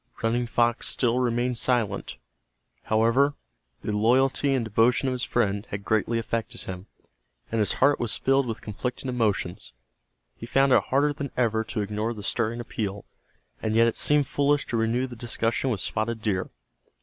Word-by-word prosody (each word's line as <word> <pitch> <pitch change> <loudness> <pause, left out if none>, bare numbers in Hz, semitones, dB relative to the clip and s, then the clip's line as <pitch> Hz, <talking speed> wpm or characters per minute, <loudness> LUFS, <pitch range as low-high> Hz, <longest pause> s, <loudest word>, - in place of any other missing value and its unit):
Running 120 +2 +1
Fox 120 0 +1
still 125 -1 +1
remained 120 0 0
silent. 115 -6 0 0.7
However, 115 +6 +3 0.5
the 105 - -2
loyalty 135 +5 +3
and 125 -3 0
devotion 115 +5 +2
of - - +1
his 125 0 -2
friend 105 -4 0
had 100 0 -5
greatly 110 +2 +1
affected 115 0 -3
him, 95 +1 -7 0.6
and 115 - 0
his 105 - +2
heart 140 +2 +3
was 120 -2 0
filled 135 -1 +2
with 115 -1 -5
conflicting 125 +5 -4
emotions. 105 - -1 0.6
He 115 - -9
found 135 +2 +3
it - - +4
harder 145 +2 +2
than 140 -1 -5
ever 110 -3 +2
to 110 - -3
ignore 105 +3 -2
the 105 - -8
stirring 115 +2 -1
appeal, 105 -4 -4 0.6
and 110 0 -1
yet 115 +1 +6
it 115 - +1
seemed 150 -1 +3
foolish 145 +1 +1
to 120 - 0
renew 115 +3 +1
the 125 -2 -8
discussion 115 +2 -1
with 105 -7 -1
Spotted 110 +1 -2
Deer. 95 -4 -1
115 Hz, 170 wpm, -26 LUFS, 110-125 Hz, 0.7 s, yet